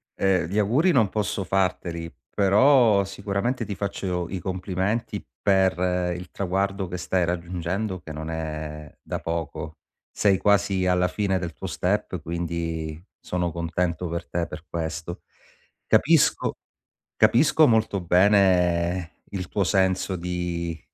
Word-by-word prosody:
ehm, 95 -3 +2
gli 100 +4 0
auguri 135 - +3
non 115 -8 +4
posso 105 -2 -2
farteli, 85 -3 -1 0.2
però 105 0 +4
sicuramente 100 +5 -2
ti 105 - -4
faccio 90 -3 -3
i 95 0 -4
complimenti 95 +4 -2 0.2
per 90 -2 +2
il 90 0 -8
traguardo 95 0 -1
che 90 - -4
stai 90 +1 0
raggiungendo 90 +3 -2
che 80 - -9
non 80 +1 -6
è 75 -2 -5
da - - -4
poco. 80 -2 -4 0.3
Sei 100 -2 +3
quasi 100 -2 +2
alla 90 0 +3
fine 95 0 0
del 85 -2 -5
tuo - - -7
step - - -1
quindi 85 -1 -4 0.2
sono 90 -1 -2
contento 85 0 -2
per 85 0 -4
te 85 -1 -1
per 75 +2 -9
questo. 80 +1 -4 0.7
Capisco - - +3 0.6
capisco 155 +5 +5
molto 110 -4 +2
bene 90 -2 +2
il 95 -2 -4
tuo 100 - 0
senso 95 -1 +1
di 85 -1 -3
90 Hz, 130 wpm, -25 LUFS, 85-100 Hz, 0.7 s, capisco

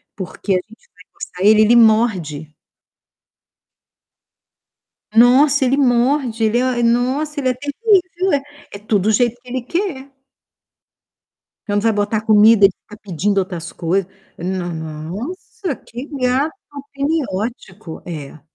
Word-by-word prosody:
Porque 195 +1 -6
a - - +3
gente 215 +5 -7
vai 200 - -18
coçar 180 +1 -6
ele, 215 0 +6
ele 220 +2 +5
morde. 190 -10 +2 2.6
Nossa! 260 +5 +5
Ele 260 +1 +2
morde, 245 -2 +1
ele 220 +2 +2
é 250 -1 0
nossa, 260 +6 0
ele 260 - 0
é 255 - +1
terrível. 365 - 0 0.3
É 200 - -7
tudo 205 -1 0
do 220 - +4
jeito 240 +2 +1
que 250 - -18
ele 255 0 -3
quer. 280 -2 -4 1.6
Quando 205 -1 0
vai 225 0 +2
botar 205 +1 -1
comida, 215 0 +5
ele 195 - +6
fica 210 - -14
pedindo 200 +1 -1
outras 175 -3 -4
coisas. 185 +2 -2 0.3
"Não 180 0 -3
nossa, 185 - -6
que 245 +4 -8
gato 260 +5 +1 0.2
ao 285 -1 -8
pene 295 +3 -1
ótico". 190 -4 -6
É. 155 -3 -8
230 Hz, 135 wpm, -18 LUFS, 195-265 Hz, 2.6 s, ele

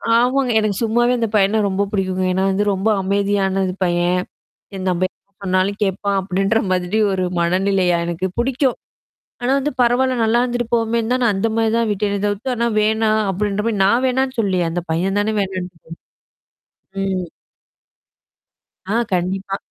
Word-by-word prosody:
ஆமாங்க. 250 +1 +2
எனக்கு 215 -2 0
சும்மாவே 240 +2 +2
இந்த 230 - +1
பையன 210 +2 +3
ரொம்ப 195 +1 0
புடிக்குங்க. 185 -2 -1
ஏனா 190 +1 0
வந்து 200 +2 +1
ரொம்ப 195 +3 0
அமைதியானது 195 -1 0
பையன் 175 +1 +1 0.5
என் 190 0 -4
நம்ப 180 +1 +1 0.4
சொன்னாலும் 185 +2 0
கேட்பான் 200 0 -1
அப்டின்ற 195 +4 0
மாதிரி 180 +3 0
ஒரு 185 -1 -1 0.2
மனநிலையா 180 +1 +2
எனக்கு 170 +2 -2
புடிக்கும். 260 +1 0 0.7
ஆனா 245 - 0
வந்து 290 +2 -2
பரவால்ல. 255 +2 +2
நல்லா 235 +2 +3
இருந்துட்டு 240 -1 -2
போமேன்னு 230 0 0
தான் 255 - 0
நான் 215 -4 +3
அந்த 210 +4 0
மாரி 225 -1 +2
தான் 230 - +1
விட்டேன் 200 0 -1
தவுத்து. 205 +6 -2
ஆனா 235 +1 +1
வேணாம் 220 0 +2
அப்டின்ற 205 +2 -1
மாரி 225 -3 0
நான் 235 +6 +3
வேணான்னு 260 0 -1
சொல்லியே 185 -4 +1
அந்த 175 +1 -3
பையன் 190 +5 0
தானே 215 +1 0
வேணான்ட்டு 185 -3 -4 0.9
போயிட் 195 0 -5
ம். 180 - -3 1.7
ஆ - - +1 0.2
கண்டிப்பா. 190 +2 -1
200 Hz, 150 wpm, -19 LUFS, 190-230 Hz, 1.7 s, பையன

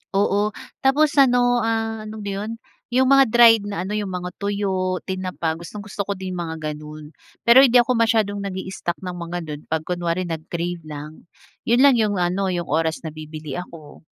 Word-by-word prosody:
Oo 205 +1 +2 0.3
tapos 285 +3 +3
ano, 245 -2 +4
ah, 225 -1 -1
ano 215 0 -7
ba 200 - -4
yun 225 +1 -5 0.3
yung 260 +2 +2
mga 275 -2 +7
dried 225 -2 +6
na 195 -3 -3
ano 195 - -5
yung 210 -1 -2
mga 180 -1 -4
tuyo, 190 -2 -1
tinapa 185 -4 -3
gustong 205 +4 -8
gusto 200 -1 -5
ko 200 - -2
din 185 0 -6
yung 180 - -4
mga 160 - -5 0.2
ganun 150 0 -10 0.3
pero 235 +3 +8
hindi 255 -3 +5
ako 245 +1 +5
masyadong 220 -3 +2
nag-i 190 -1 -5
stock 175 -2 -3
ng 180 - -4
mga 170 +1 -4
nun 150 -1 -7
pag 160 0 -1
kunwari 175 +1 -2
nag-crave 170 +1 -4
lang 150 +2 -9 0.4
yun 240 +4 +4
lang 265 -4 +6
yung 210 -2 +1
ano 180 +2 0
yung 175 -2 -2
oras 160 +1 0
na 160 - -5
bibili 155 -1 -7
ako. 165 -4 -11
190 Hz, 190 wpm, -22 LUFS, 170-225 Hz, 0.4 s, pero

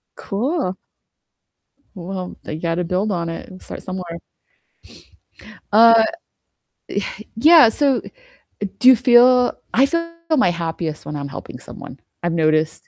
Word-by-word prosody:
Cool. 220 - -3 1.2
Well, 185 0 -7
you 155 - -6
gotta 170 +1 -1
build 185 +5 -1
on 170 -2 -2
it 165 - -8
and 185 0 -13
start - - -9
somewhere. 180 -3 -6 1.5
Uh, 230 +1 +7 1.1
eh, - - -12
yeah, 300 +2 +7
so 275 +2 +1 0.8
do 250 - +3
you 260 - +9
feel 245 +1 +5 0.2
I 260 +4 +4
feel 335 +3 -2 0.3
my 255 -9 +3
happiest 165 -2 -5
when 150 - -6
I'm 140 -1 -5
helping 135 - -9
someone, - - -11 0.2
I've 175 - -1
noticed. 155 -1 0
190 Hz, 125 wpm, -19 LUFS, 170-250 Hz, 1.5 s, you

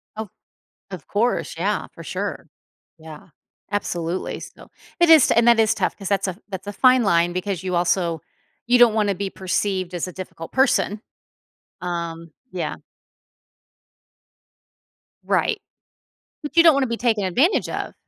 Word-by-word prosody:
Of 220 -1 -6 0.6
of 185 -5 -8
course, 230 +4 -1
yeah, - - -1
for - - -10
sure. - - -5 0.5
Yeah, 160 +1 -12 0.4
absolutely, 175 -3 -3
so, - - -12 0.3
it 345 -1 +5
is 315 -5 +8
t - - +3
and 235 0 +4
that 235 -1 +6
is 220 0 +3
tough - - -1
'cause 195 -2 -6
that's 195 -1 0
a 180 - -4
that's 190 -1 -7
a 205 - -4
fine 255 +3 +4
line 170 -3 +2
because 185 0 -3
you 185 -1 -3
also 170 -2 +1 0.5
you 245 +1 +4
don't 240 -3 +6
wanna 210 -2 +1
be 195 +1 -4
perceived 185 -1 -2
as 175 +1 -2
a - - -8
difficult 175 -2 -9
person. 260 -5 +2 0.8
Um, 170 -2 -5 0.2
yeah 180 -2 -3 2.5
Right, 430 -3 0 0.8
but 295 +3 -7
you 335 - +8
don't 325 - +7
wanna 275 -1 +1
be 235 0 -3
taken 225 -4 +1
advantage 260 - +2
of. - - -4
195 Hz, 155 wpm, -22 LUFS, 175-235 Hz, 2.5 s, is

